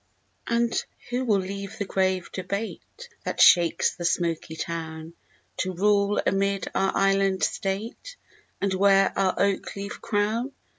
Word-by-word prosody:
And 235 0 +1 0.3
who 250 +1 -1
will 215 -4 +3
leave 195 +1 -6
the 200 - -2
grave 185 -1 0
debate 200 - -5 0.2
That - - -4
shakes 170 -2 +5
the 175 - -8
smoky 170 -2 -1
town, 160 0 -5 0.4
To 185 0 -1
rule 205 +2 +2
amid 195 0 0
our 195 0 +1
island 195 -1 +2
state, 220 - -3 0.4
And 195 -1 0
wear 195 0 +4
our 190 -1 +1
oak 200 -1 0
leaf 200 +1 -6
crown? 225 +5 -1
195 Hz, 135 wpm, -25 LUFS, 185-205 Hz, 0.4 s, shakes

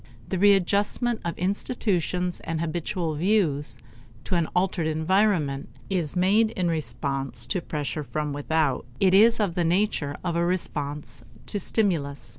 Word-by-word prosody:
The 190 - -1
readjustment 205 +4 +3
of 170 - -3
institutions 180 -2 -1
and 165 -1 -4
habitual 170 +1 -2
views 150 - +1 0.5
to - - -4
an 170 -3 +2
altered 180 -3 +1
environment 160 - +1 0.2
is 175 -5 -1
made 200 +5 +4
in 185 -6 -1
response 140 -4 -2
to 185 - -1
pressure 150 -1 -3
from 145 +3 -3
without; 145 -3 0
it 190 -1 +4
is 225 +4 +6
of 200 -5 +1
the 175 0 0
nature 165 -5 +1
of 175 -2 -1
a 170 - +2
response 150 -6 -2 0.2
to 205 - -3
stimulus. 170 -9 -1
170 Hz, 140 wpm, -25 LUFS, 150-195 Hz, 0.5 s, is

